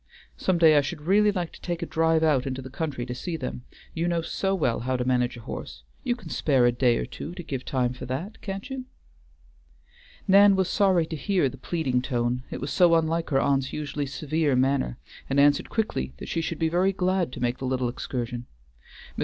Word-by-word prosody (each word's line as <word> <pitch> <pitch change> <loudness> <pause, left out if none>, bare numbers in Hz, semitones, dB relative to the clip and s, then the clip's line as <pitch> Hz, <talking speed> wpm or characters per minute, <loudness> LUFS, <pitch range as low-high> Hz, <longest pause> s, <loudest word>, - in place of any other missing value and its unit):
Some 185 -2 +1
day 160 -2 +6
I - - +6
should 150 +3 -5
really 205 +6 +4
like 180 -4 -3
to - - -14
take 175 -1 -3
a - - -1
drive 160 0 +2
out 140 -5 +2
into 130 0 -4
the 130 - -9
country 140 -5 -3
to 125 - -4
see 165 +7 -4
them, 65 - -6 0.3
you 165 +1 -1
know 170 -1 0
so 195 +3 -1
well 130 -10 0
how 130 +2 -1
to 125 - -2
manage 125 -1 +1
a - - -9
horse. 105 - -7 0.2
You 240 - 0
can 200 -9 -11
spare 135 -6 +2
a 120 - +5
day 120 -1 +2
or - - -2
two 175 - -8
to 175 - -7
give 135 -5 -4
time 125 -2 0
for 125 - -8
that, 155 - -5
can't 195 0 -5
you?" 265 -1 -5 1.4
Nan 200 +1 +7
was 190 -2 +1
sorry 190 -5 +3
to 160 - -5
hear 180 -2 +1
the 135 - -10
pleading 135 -6 -1
tone, 125 -1 -1
it - - -5
was 140 - -4
so 175 -2 +5
unlike 165 0 0
her 135 -3 +3
aunt's 135 -1 +1
usually 150 -1 -3
severe 150 +1 0
manner, 130 - +1 0.3
and 135 +1 +2
answered 145 0 +4
quickly 65 - -2
that - - -8
she 165 - -1
should 165 0 -3
be 160 - +1
very 180 +4 +2
glad 185 -4 0
to - - -6
make 120 0 -1
the 130 - -4
little 130 -1 0
excursion. 120 0 -4 0.7
Mr. - - -6
150 Hz, 225 wpm, -26 LUFS, 130-175 Hz, 1.4 s, Nan